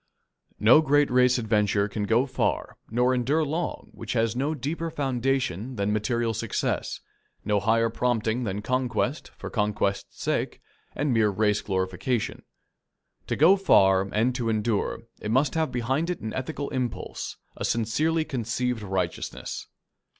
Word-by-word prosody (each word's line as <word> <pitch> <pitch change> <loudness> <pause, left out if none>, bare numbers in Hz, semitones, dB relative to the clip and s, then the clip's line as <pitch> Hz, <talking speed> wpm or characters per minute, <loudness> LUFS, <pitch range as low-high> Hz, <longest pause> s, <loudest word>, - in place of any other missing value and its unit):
No 115 +8 +7
great 145 -2 +3
race 125 0 +4
adventure 105 -3 +1
can 105 0 -3
go 115 +5 +3
far 130 - -1
nor 125 +3 +2
endure 135 +6 +1
long 160 +4 -3
which - - -6
has 115 -1 +1
no 145 +5 0
deeper 160 +4 -3
foundation 130 - -1
than 100 -1 0
material 115 +2 0
success, - - -2 0.4
no 105 -1 +2
higher 115 +2 +2
prompting 120 0 0
than 105 -1 -3
conquest 130 +2 -1
for - - -7
conquest's 105 -2 -1
sake - - -1 0.4
and 145 -2 0
mere 110 -2 +4
race 105 +1 +1
glorification. 100 +5 -2 0.9
To - - 0
go 170 +6 +6
far 95 - +5
and 115 +4 +2
to 120 -2 -1
endure, 110 -1 0 0.2
it 105 - -5
must 130 +5 +2
have 160 -1 0
behind 130 +7 0
it 180 - -2
an 110 - -5
ethical 140 +2 -4
impulse, 125 -3 -4 0.2
a - - -5
sincerely 155 +9 +1
conceived 125 -2 -2
righteousness. 95 -4 -3
120 Hz, 145 wpm, -26 LUFS, 105-135 Hz, 0.9 s, No